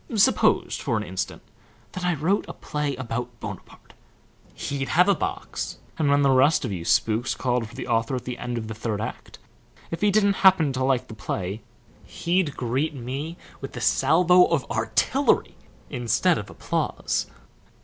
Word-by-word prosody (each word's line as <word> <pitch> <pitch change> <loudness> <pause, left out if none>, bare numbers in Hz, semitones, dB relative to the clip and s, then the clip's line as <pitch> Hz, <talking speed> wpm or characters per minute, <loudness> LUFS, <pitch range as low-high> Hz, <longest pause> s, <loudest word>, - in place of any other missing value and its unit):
Suppose, 220 +5 +3
for - - -1
an - - -2
instant, - - -4 0.5
that 185 - -6
I 175 -1 +1
wrote 170 +7 +1
a - - -6
play 150 -2 -3
about 125 -1 -4
Bonaparte! 100 -4 -9 0.6
He'd 135 -1 -3
have 180 +3 +4
a 200 - +6
box, 380 - -4 0.2
and 150 -3 +2
when 140 0 +4
the 135 - +4
rest 135 +3 +4
of 115 - -3
you 90 -4 -4
spooks 115 +5 +2
called 125 -3 -1
for 115 - -14
the - - -6
author 115 +1 +1
at 125 - -4
the 125 -1 -5
end 120 -1 -3
of 110 -1 -4
the 110 - -5
third 110 -1 -3
act, 110 - -6 0.5
if 165 - -4
he 210 - +4
didn't 200 -1 +3
happen 185 -8 +5
to 130 0 -1
like 130 -1 +1
the - - -9
play 100 -1 -4 0.4
he'd 170 -3 -1
greet 130 +6 -1
me 135 +7 -5 0.2
with - - -7
a - - -4
salvo 180 +2 +5
of 160 -6 0
artillery 115 - +1 0.4
instead 120 -4 +2
of - - -8
applause." - - -2
135 Hz, 175 wpm, -25 LUFS, 115-170 Hz, 0.6 s, a